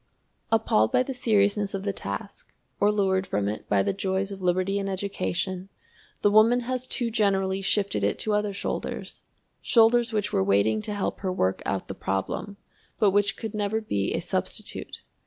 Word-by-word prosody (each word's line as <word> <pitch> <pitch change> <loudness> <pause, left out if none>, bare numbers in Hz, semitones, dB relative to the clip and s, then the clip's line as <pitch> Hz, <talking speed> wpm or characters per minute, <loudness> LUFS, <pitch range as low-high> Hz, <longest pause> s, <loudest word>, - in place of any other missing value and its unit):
Appalled 160 - +3
by 250 - +3
the 270 - -5
seriousness 205 -4 +2
of 195 - -4
the 200 -1 -1
task, 100 - -7 0.2
or 205 +1 +4
lured 190 -2 +1
from 100 - -1
it 105 +1 -5
by 100 -1 +3
the - - 0
joys 195 0 -1
of 195 -1 -7
liberty 185 +2 +1
and 195 0 -2
education, 190 -1 -3 0.5
the 205 - +5
woman 225 +4 +5
has 255 +1 -2
too 240 -3 -1
generally 195 -3 +1
shifted 200 +1 0
it - - +1
to 215 - -1
other 210 0 +1
shoulders 195 - -4 0.4
shoulders 235 0 +4
which 210 -2 -1
were 95 - +3
waiting 100 +2 +2
to 210 - -3
help 200 - -2
her 190 -2 -2
work 95 - 0
out 95 - -2
the - - -5
problem, 100 - -3 0.4
but 210 -3 +4
which 205 +1 +2
could 225 -2 -5
never 210 +1 0
be 100 - -1
a - - -1
substitute. - - -3
200 Hz, 180 wpm, -26 LUFS, 185-215 Hz, 0.5 s, the